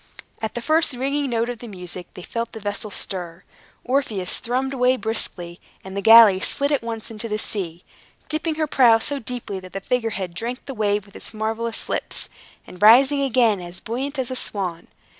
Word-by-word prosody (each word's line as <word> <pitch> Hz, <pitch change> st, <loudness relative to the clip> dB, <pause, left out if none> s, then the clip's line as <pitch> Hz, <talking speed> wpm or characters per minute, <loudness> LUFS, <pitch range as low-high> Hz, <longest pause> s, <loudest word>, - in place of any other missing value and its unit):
At 220 Hz, -, -3 dB
the 240 Hz, -, -4 dB
first 315 Hz, -2 st, +4 dB
ringing 275 Hz, +3 st, -1 dB
note 230 Hz, -1 st, 0 dB
of 245 Hz, -2 st, -5 dB
the 240 Hz, -, -9 dB
music, 180 Hz, -3 st, -8 dB
they 180 Hz, -, -9 dB
felt 230 Hz, +3 st, -4 dB
the 220 Hz, -, -7 dB
vessel 205 Hz, +1 st, -4 dB
stir. 180 Hz, -3 st, -3 dB, 0.4 s
Orpheus 235 Hz, -8 st, -1 dB
thrummed 260 Hz, +3 st, -1 dB
away 255 Hz, 0 st, +3 dB
briskly, 180 Hz, -7 st, -3 dB, 0.2 s
and 190 Hz, 0 st, -8 dB
the 200 Hz, -, -1 dB
galley 225 Hz, -3 st, +9 dB
slid 280 Hz, +8 st, 0 dB
at 285 Hz, -, +2 dB
once 230 Hz, -1 st, -6 dB
into 225 Hz, +1 st, -6 dB
the 210 Hz, -, -1 dB
sea, 180 Hz, -6 st, -4 dB, 0.4 s
dipping 315 Hz, +1 st, -1 dB
her 310 Hz, 0 st, 0 dB
prow 250 Hz, -6 st, +5 dB
so 280 Hz, +5 st, -2 dB
deeply 240 Hz, -5 st, -5 dB
that 185 Hz, 0 st, -12 dB
the 195 Hz, -, -3 dB
figure 230 Hz, +3 st, 0 dB
head 190 Hz, -5 st, -4 dB
drank 235 Hz, +7 st, -5 dB
the 270 Hz, -, -6 dB
wave 210 Hz, -3 st, 0 dB
with 200 Hz, -, -20 dB
its -, -, -6 dB
marvelous 225 Hz, +1 st, -2 dB
lips, -, -, -2 dB, 0.4 s
and 180 Hz, -, -13 dB
rising 265 Hz, +6 st, +7 dB
again 235 Hz, -7 st, +3 dB
as 175 Hz, 0 st, -9 dB
buoyant 270 Hz, +6 st, -4 dB
as 260 Hz, -1 st, -2 dB
a -, -, -2 dB
swan. 185 Hz, -8 st, -3 dB
225 Hz, 195 wpm, -22 LUFS, 195-255 Hz, 0.4 s, galley